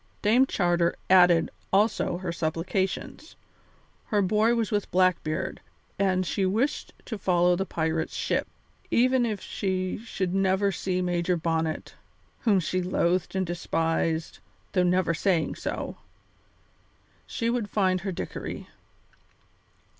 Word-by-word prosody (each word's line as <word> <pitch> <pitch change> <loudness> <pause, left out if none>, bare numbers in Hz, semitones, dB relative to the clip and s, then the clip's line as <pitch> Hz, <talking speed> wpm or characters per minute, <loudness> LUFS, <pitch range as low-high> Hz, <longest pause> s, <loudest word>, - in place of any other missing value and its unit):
Dame 240 +6 +4
Charter 175 -4 +1 0.2
added 175 -3 +6 0.2
also 200 -3 +2
her 185 -1 -4
supplications. 175 - -3 0.7
Her 205 -2 +2
boy 215 +5 +3
was 230 0 -1
with 205 -1 -1
Blackbeard, 185 -2 0 0.4
and 185 -2 +2
she 195 - -1
wished 220 +10 0
to 220 -4 -5
follow 180 -1 +3
the 190 +2 -2
pirate's 160 0 -2
ship. - - -1 0.4
Even 250 0 +3
if 210 -4 -3
she 185 -2 -2
should 195 -5 -3
never 195 +1 +2
see 185 0 -2
Major 175 0 0
Bonnet 160 -1 -2 0.5
whom 210 -5 +3
she 185 +2 -1
loathed 180 +1 0
and 190 0 +1
despised, 165 -1 -1 0.3
though 185 - +2
never 180 -1 +2
saying 170 -2 +1
so - - -5 1.3
she 230 -1 -1
would 235 -4 -2
find 185 -3 +1
her 195 0 -3
Dickory. 175 - -6
185 Hz, 125 wpm, -27 LUFS, 175-205 Hz, 1.3 s, added